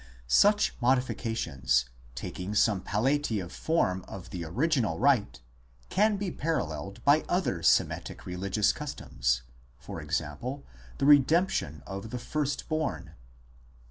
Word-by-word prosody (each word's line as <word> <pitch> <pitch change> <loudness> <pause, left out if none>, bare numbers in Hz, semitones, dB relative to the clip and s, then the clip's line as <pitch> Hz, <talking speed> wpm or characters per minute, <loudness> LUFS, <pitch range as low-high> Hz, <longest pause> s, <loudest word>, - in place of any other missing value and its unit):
Such 205 - +4
modifications, 115 - +1 0.3
taking 90 +10 -5
some 105 -3 +3
palliative 110 -3 0
form 95 - 0
of 90 -2 -9
the 90 -2 -4
original 115 - 0
rite, 105 - +2 0.5
can 210 +1 +3
be 195 -2 -3
paralleled 100 - -3
by 145 +2 +5
other 175 - 0
Semitic - - +1
religious 95 +3 0
customs, - - -2 0.4
e.g. - - -2 0.7
the - - 0
redemption 145 - +3
of 100 +2 -6
the 125 - -4
first 145 +2 -2
born. 155 -2 -2
110 Hz, 110 wpm, -29 LUFS, 90-145 Hz, 0.7 s, by